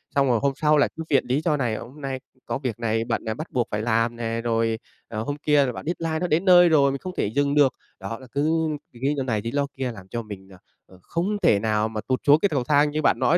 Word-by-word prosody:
Xong 140 -1 +3
rồi 120 -3 +3
hôm 140 -1 +1
sau 150 -1 +3
lại 145 - +3
cứ 160 - -4
viện 140 -3 +3
lý 135 +5 +1
do 155 -3 +1
này, 120 -5 -1
hôm 145 +4 -10
nay 135 -1 -3 0.3
có - - -2
việc 125 -4 -4
này 115 -1 0
bận 115 -1 -2 0.2
bắt 155 - -7
buộc 120 -2 0
phải 105 0 -1
làm 115 +1 +1
nè, 115 0 -3
rồi, 115 -1 0 0.3
ờ, 110 -1 -4
hôm 145 +3 -3
kia 145 -1 +3
là 125 - -1
bận - - -8
deadline 165 -1 -2
nó 180 - -1
đến 170 +5 +1
nơi 175 -1 +7
rồi, 140 -3 +4
mình 140 - -4
không 185 -1 -6
thể - - +1
dừng 140 +6 0
được. 145 -3 +4 0.3
Đó 100 +5 -6
là 130 - -13
cứ 145 +3 +1 0.4
lí 135 +5 -1
do 135 - 0
này, 110 -5 -1
lí 115 +1 -4
do 140 0 0
kia 130 -2 -2
làm 95 -4 -12
cho 115 +4 -4
mình, 100 -3 -10
à, - - -14 0.3
à, 95 - -17
không 190 - -2
thể 100 - +4
nào 110 0 +1
mà 110 -1 -4
tụt 130 -1 +1
xuống 145 +2 +7
cái 200 - +2
cầu 135 -5 0
thang 145 +2 +3
như 155 +1 -1
bạn - - +2
nói 175 - +4
135 Hz, 285 wpm, -24 LUFS, 115-150 Hz, 0.4 s, nơi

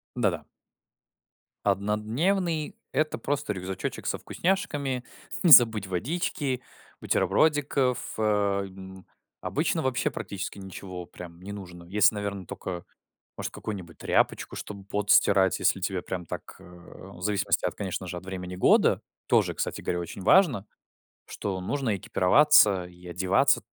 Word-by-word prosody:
Да-да. - - 0 1.2
Однодневный- 120 - 0
это 155 +2 0
просто 145 -6 -2
рюкзачочек 95 0 -5
со - - 0
вкусняшками, 145 -9 -1 0.4
не 175 - +5
забыть 115 -6 +8
водички, 130 - -2 0.4
бутербродиков, 135 - +1
а, 105 -2 +1
м. 95 -1 -11 0.4
Обычно 160 +2 0
вообще 130 -4 0
практически 100 0 -5
ничего 95 -2 -8
прям 85 0 -11
не 100 +2 -8
нужно. 90 -4 -9
Если, 105 +5 +4
наверно, 100 -2 -4
тока, 90 0 -6 0.5
может, - - -4
какую-нибудь 95 -6 -7
тряпочку, - - 0
чтобы 100 -2 -8
пот 100 +1 -2
стирать, 95 -2 +5
если 95 - +2
тебе 95 -1 -2
прям 90 -2 -5
так, - - -7
э, - - -14
в 90 +1 -13
зависимости 105 0 +1
от, - - -1
конечно 95 -1 -4
же, 90 - -5
от 90 - -7
времени 90 -1 -6
года. 95 - +4 0.3
Тоже, - - +2
кстати - - -3
говоря, 90 - -2
очень 85 +3 -7
важно, 125 - +4 0.6
что 95 -2 -4
нужно 115 +2 -1
экипироваться 100 - +5
и 90 0 -15
одеваться 90 +2 +2
100 Hz, 130 wpm, -27 LUFS, 95-130 Hz, 1.2 s, забыть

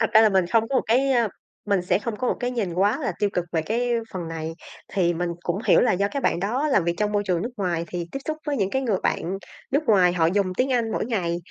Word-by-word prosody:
thật 225 - +1
ra 220 - +9
là 220 - +6
mình 190 -3 +2
không 225 +4 +2
có 275 - -3
một - - +2
cái 260 +4 +3 0.5
mình 200 -3 +2
sẽ 180 - +2
không 220 0 -4
có 250 +3 -1
một - - +2
cái 245 - -1
nhìn 215 -9 -2
quá 200 +4 +2
là - - -1
tiêu 205 -2 +1
cực 180 - -1
về 165 -2 +1
cái 235 +7 -1 0.2
phần 175 -3 -4
này. 160 0 -4 0.4
Thì 175 -3 +2
mình 175 +1 -2
cũng 175 +2 -1
hiểu - - +6
là 245 - +3
do 200 +2 +1
các 280 +5 -4
bạn 170 - +1
đó 245 +10 0
làm 260 - +3
việc 170 0 0
trong 210 0 0
môi 205 - +1
trường 180 -2 +1
nước 235 - -3
ngoài 175 -5 -1
thì 175 -1 -4
tiếp - - -3
xúc 310 - -1
với 290 -1 0
những 195 -5 0
cái 265 +4 0
người 220 -7 +1
bạn 190 +3 -1 0.3
nước 285 +3 +2
ngoài 190 -6 +5
họ 165 -2 +2
dùng 195 +3 +2
tiếng 260 +1 +2
Anh 235 -3 +1
mỗi - - -1
ngày, 185 -8 -1
200 Hz, 285 wpm, -24 LUFS, 175-235 Hz, 0.5 s, ra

